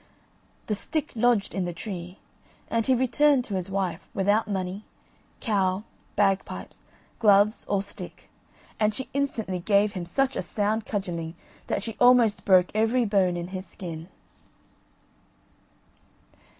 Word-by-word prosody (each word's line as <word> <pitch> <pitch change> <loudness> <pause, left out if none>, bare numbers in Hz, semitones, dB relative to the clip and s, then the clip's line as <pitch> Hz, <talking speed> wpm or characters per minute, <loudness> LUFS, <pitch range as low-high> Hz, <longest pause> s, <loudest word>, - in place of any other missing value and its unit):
The 215 - -1
stick 305 +9 -3
lodged 235 -3 +2
in 190 -2 -1
the 175 - -3
tree, 180 0 -7 0.5
and 230 -1 +1
he 260 - +5
returned 260 +2 +3
to 205 - -6
his 185 0 -2
wife 190 -2 -1
without 205 +2 +2
money, 190 0 -3 0.6
cow, 195 -3 +1 0.3
bagpipes, 195 -1 0 0.4
gloves, 210 -1 +4
or 200 -1 0
stick, 200 - -9 0.5
and 215 -1 +2
she 260 - -6
instantly 230 -9 -1
gave 200 +3 +3
him 180 -4 -5
such 270 +9 +1
a - - -1
sound 210 +4 -1
cudgelling 170 -5 -3 0.3
that - - -1
she 225 -2 -6
almost 245 -4 +5
broke 185 -2 +5
every 225 +3 +2
bone 190 -4 +2
in 175 +1 -5
his 190 -1 -6
skin. 165 -2 -7
205 Hz, 135 wpm, -26 LUFS, 185-225 Hz, 0.6 s, he